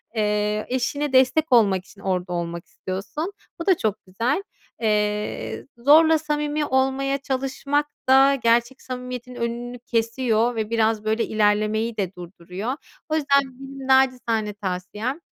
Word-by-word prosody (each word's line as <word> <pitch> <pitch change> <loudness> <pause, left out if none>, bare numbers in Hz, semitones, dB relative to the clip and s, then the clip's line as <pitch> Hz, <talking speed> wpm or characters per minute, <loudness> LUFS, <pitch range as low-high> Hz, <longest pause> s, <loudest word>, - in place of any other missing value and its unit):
Eee, 210 0 0
eşine 265 +3 -1
destek 265 +4 +4
olmak 200 -6 +4
için 200 - -17
orada 180 -2 -1
olmak 170 0 -4
istiyorsun. 210 - -5 0.3
Bu - - -3
da 375 -3 +4
çok 215 -2 0
güzel. 235 - -1 0.4
Eee, 210 - -1
zorla 315 +6 +6
samimi 300 0 -1
olmaya 270 +1 +1
çalışmak 275 +2 -1 0.2
da 270 +1 +6
gerçek 235 +1 +1
samimiyetin 250 -1 -6
önünü 240 +1 -4
kesiyor 230 0 0
ve 220 -1 -2
biraz, 225 -1 +1
böyle, 220 +1 +1
ilerlemeyi 215 +1 +1
de 195 -2 -2
durduruyor. 180 +6 -6 0.4
O 310 - +1
yüzden 280 -2 +4 0.2
benim 270 0 -8
naçizane 250 -5 +2
tavsiyem, 205 - -4
235 Hz, 130 wpm, -23 LUFS, 210-270 Hz, 0.4 s, zorla